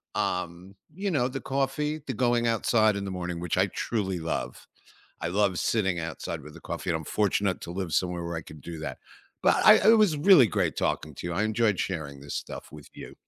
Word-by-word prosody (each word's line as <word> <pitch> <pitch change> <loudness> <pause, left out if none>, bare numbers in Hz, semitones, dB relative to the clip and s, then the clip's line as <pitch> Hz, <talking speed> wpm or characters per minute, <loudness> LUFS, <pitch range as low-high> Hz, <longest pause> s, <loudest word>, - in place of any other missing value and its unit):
um, 90 +2 -3 0.2
you 195 +3 -2
know, 130 -7 +1
the 135 +1 -5
coffee, 140 +3 -1
the - - -3
going 120 -1 +1
outside 110 -1 +3
in 100 0 -3
the 95 - -4
morning, 90 -2 -4
which 90 0 -2
I 95 - +4
truly 95 -3 -2
love. 65 -6 -4 0.5
I 80 - -2
love 100 -1 +1
sitting 95 -6 +1
outside 80 -1 -5
with 75 +1 -12
the - - -12
coffee, - - -6
and 80 - +1
I'm 80 - -6
fortunate 100 -1 0
to 85 - -7
live 95 -3 -4
somewhere 90 -2 0
where 85 0 -4
I - - -3
can 75 -1 -12
do 85 +2 -8
that. - - -5 0.5
But - - +4
I - - +11 0.2
it 225 - +6
was 190 -8 +4
really 150 - +7
great 90 - 0
talking 75 -1 -1
to - - -6
you. 85 - -3
I 105 - 0
enjoyed 110 -3 +1
sharing 70 -7 -3
this 70 0 -7
stuff - - -6
with 75 -2 -12
you. - - -10
95 Hz, 220 wpm, -27 LUFS, 85-120 Hz, 0.5 s, I